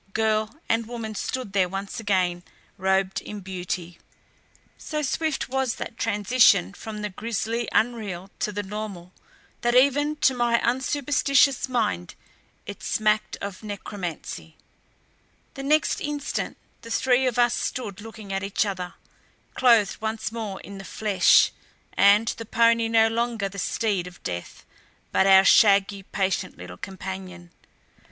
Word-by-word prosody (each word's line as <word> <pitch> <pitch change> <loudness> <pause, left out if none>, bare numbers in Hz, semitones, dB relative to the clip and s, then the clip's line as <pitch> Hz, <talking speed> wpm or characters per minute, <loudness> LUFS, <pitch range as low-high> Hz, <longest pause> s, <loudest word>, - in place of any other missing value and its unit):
Girl 220 +1 0
and 225 0 0
woman 230 -2 -5
stood 230 0 -4
there 185 -2 +2
once 195 +3 -5
again 185 -5 0 0.3
robed 190 0 0
in 210 -1 -8
beauty. 180 -2 -5 0.8
So 305 -1 -4
swift 315 +1 -1
was 265 -2 -1
that 230 - -6
transition 210 - +3
from 210 -1 -7
the 210 - -2
grisly 230 +3 -3
unreal 205 -5 -1
to 210 - -1
the 205 0 -3
normal 195 -3 -7 0.5
that 240 +1 +1
even 285 +3 +4
to 265 - +5
my 240 -1 +2
unsuperstitious 275 +1 +2
mind 215 - -1 0.5
it - - -8
smacked 215 0 0
of 200 -2 -6
necromancy. 190 - -6 1.0
The 275 - -7
next 305 +3 +2
instant 295 -1 -3 0.2
the 230 - -11
three 255 +2 +2
of 245 - -1
us 240 0 +4
stood 210 -8 -4
looking 215 -2 -9
at 195 - -1
each 195 +2 0
other, 185 -3 -4 0.6
clothed 230 -5 +4
once 220 0 -3
more 220 -4 -5
in 200 -1 -10
the - - -8
flesh, 200 -2 +4 0.4
and 205 +3 +5
the 230 0 -3
pony 230 +1 +3
no 225 -1 +4
longer 230 -2 -1
the 200 +1 -8
steed 200 -3 -1
of 180 - -14
death, 85 0 -6 0.5
but 190 - +3
our 190 0 +7
shaggy, 200 -2 +5
patient 190 -1 -2
little 90 0 -9
companion. 185 - -8
215 Hz, 140 wpm, -25 LUFS, 195-235 Hz, 1.0 s, our